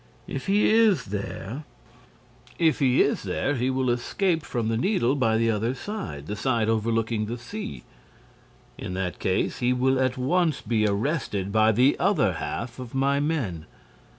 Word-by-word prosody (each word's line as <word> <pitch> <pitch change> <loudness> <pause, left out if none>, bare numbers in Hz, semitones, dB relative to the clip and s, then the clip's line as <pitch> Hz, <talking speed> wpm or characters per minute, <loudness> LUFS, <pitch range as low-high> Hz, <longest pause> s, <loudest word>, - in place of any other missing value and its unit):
If 135 - -6
he 205 +2 +3
is 220 -4 +4
there—" 105 +6 -5 0.9
"If 160 -2 +2
he 130 -2 +4
is - - 0
there, 145 - -1
he 125 -1 0
will 130 -1 +1
escape 165 - 0
from 120 -6 -3
the 115 - 0
Needle 130 - +1
by 115 -6 +2
the 115 0 +2
other 115 +4 -1
side, 160 - -6
the 105 - -4
side 115 +1 0
overlooking 115 0 0
the 120 +2 -4
sea." 110 - -7 1.0
"In 90 - -5
that 95 -1 -3
case, 95 - 0
he 125 0 +2
will 130 +1 +2
at 130 0 +1
once 160 +5 +1
be 110 -1 +1
arrested 100 - -1
by 110 +1 +4
the 125 +6 +3
other 150 - +2
half 115 - -5
of 125 0 -8
my 140 +1 +2
men." 120 - -2
120 Hz, 165 wpm, -25 LUFS, 110-140 Hz, 1.0 s, is